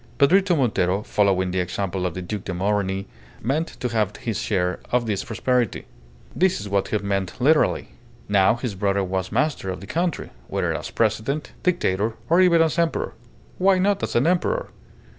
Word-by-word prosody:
Pedrito 180 +5 +4
Montero, 100 -6 +1
following 95 -4 +1
the 95 - -1
example 90 0 -2
of 85 - -6
the 90 - -4
Duc 100 +2 -5
de 95 - -3
Morny, 95 0 0 0.3
meant 150 +8 0
to 125 - -1
have 110 -3 0
his 110 -5 -3
share 90 -3 0
of 120 -1 +2
this 100 -3 -1
prosperity. 120 0 -1 0.5
This 185 0 +2
is 100 - -6
what 100 -1 0
he 110 - 0
meant 100 -1 -2
literally. 150 +5 +3 0.4
Now 100 +1 +4
his 120 -2 -4
brother 100 0 0
was 95 0 -2
master 140 -4 0
of 95 - -4
the 100 - -10
country, 170 - -2 0.2
whether - - -1
as - - -5
President, 115 +7 -1
Dictator, 110 - 0 0.2
or 175 +2 +6
even 170 -3 +5
as 160 +1 0
Emperor 165 -1 0 0.5
why 190 +1 +4
not 200 +1 +2
as - - -3
an 120 - +3
Emperor? 185 - 0
110 Hz, 180 wpm, -23 LUFS, 95-155 Hz, 0.5 s, or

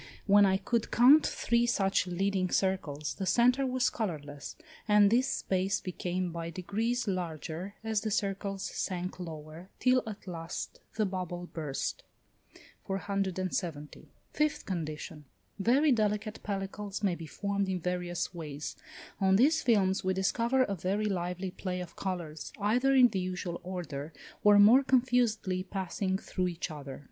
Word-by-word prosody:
When 205 0 +6
I 190 0 +3
could 230 +3 -1
count 270 +6 +7
three 235 0 +1
such 195 -4 +2
leading 185 +1 0
circles, 160 -7 -1
the 190 - -4
centre 250 +7 +4
was 255 -1 +1
colourless, 150 -10 -5 0.3
and 210 -1 +6
this 250 +3 +3
space 190 -5 0
became 180 0 -3
by 165 0 -4
degrees 220 +8 -2
larger 175 +1 -4
as 220 -2 0
the 220 - -2
circles 195 -1 -2
sank 185 0 -3
lower, 160 +1 -8
till 255 0 +3
at 215 -1 -7
last 165 -3 -6 0.2
the 220 -1 +2
bubble 180 -2 -4
burst. 150 -4 -3 0.9
470. 185 -5 -3 0.2
Fifth 300 0 0
condition. 155 -3 -5 0.3
Very 270 +9 +4
delicate 215 -2 0
pellicles 200 0 -4
may 195 -3 +3
be 165 -2 -7
formed 200 +3 -2
in 185 -1 -1
various 175 0 -2
ways: 150 -4 -6 0.4
on 190 0 +4
these 295 +9 +4
films 200 -5 +2
we 190 0 +1
discover 235 +7 +2
a 200 - -2
very 195 +4 -1
lively 180 -1 -2
play 180 0 -4
of 180 -2 -7
colours, 170 -5 -4
either 245 +7 +3
in 250 -2 +7
the 195 - -2
usual 180 -1 -4
order, 170 -5 -5 0.3
or 210 0 +7
more 220 +6 +8
confusedly 245 -8 +2
passing 190 0 -2
through 185 -1 -2
each 170 -1 -4
other. 140 -3 -7
190 Hz, 145 wpm, -30 LUFS, 175-215 Hz, 0.9 s, more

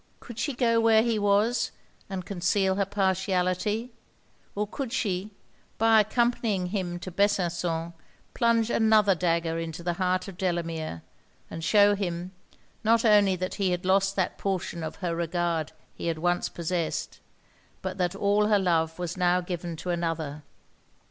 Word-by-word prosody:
Could 235 -1 -10
she 285 +3 -1
go 230 -2 +2
where 225 -1 +5
he 230 -2 0
was, 205 +4 +2 0.4
and 190 -2 -5
conceal 190 0 +1
her 195 0 0
partiality? 190 +3 0 0.6
or 210 +1 0
could 255 +3 -5
she, 200 -5 -1 0.5
by 225 0 +5
accompanying 220 -3 +1
him 180 -2 -3
to 185 - -6
Besançon, 175 -4 0 0.4
plunge 235 -1 +2
another 215 -3 +4
dagger 165 -1 0
in 165 0 -3
the 170 +2 -3
heart 185 +1 0
of 190 -3 -10
Delamere, 165 - -2 0.5
and 165 - -6
shew 205 +3 +5
him, 180 -2 -3 0.5
not 230 +1 +3
only 205 -3 +5
that 185 +1 -3
he 190 - +2
had 180 0 -2
lost 195 +1 +2
that 185 -2 -1
portion 185 -3 -2
of 160 0 -5
her 170 -1 -1
regard 170 -2 -1 0.2
he - - -6
had 165 -1 -1
once 175 +2 0
possessed, 170 -1 -3 0.6
but 190 0 -4
that 180 +1 0
all 205 +1 +2
her 210 -1 +4
love 165 -4 +1
was 175 -1 -4
now 180 0 +3
given 175 -1 -5
to 180 +3 -4
another. 165 -4 -2
185 Hz, 155 wpm, -27 LUFS, 175-205 Hz, 0.6 s, where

